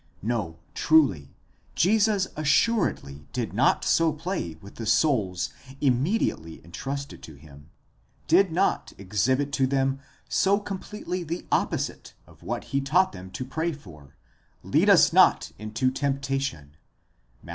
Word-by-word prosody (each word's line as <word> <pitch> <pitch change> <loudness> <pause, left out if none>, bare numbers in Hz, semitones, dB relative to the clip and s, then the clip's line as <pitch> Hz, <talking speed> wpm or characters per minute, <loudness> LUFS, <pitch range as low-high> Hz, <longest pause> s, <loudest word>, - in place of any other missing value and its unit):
No 105 -8 -2 0.2
truly: 135 - +2 0.4
Jesus 205 +1 +3
assuredly 150 - 0
did - - -3
not - - +2
so 165 -1 +3
play 155 - -4
with 100 +6 -14
the 115 - -5
souls 110 - +1 0.3
immediately 130 - 0
entrusted 140 +10 -6
to 80 - -11
him, 70 +1 -16 0.6
did 185 +2 +4
not 185 +4 0
exhibit 125 +9 0
to 135 -1 +2
them 135 0 0 0.3
so 200 +1 +2
completely 195 -2 -5
the 170 +2 -5
opposite - - -2
of - - -20
what - - -4
he 140 - +2
taught 165 +8 +2
them 95 -1 -10
to 130 +7 -6
pray 160 +6 -2
for, 75 - -14 0.6
ead - - +4
us - - +6
not - - +4
into 110 +5 -1
temptation 135 - -3 0.7
(Matt. - - -14
135 Hz, 130 wpm, -26 LUFS, -, 0.7 s, us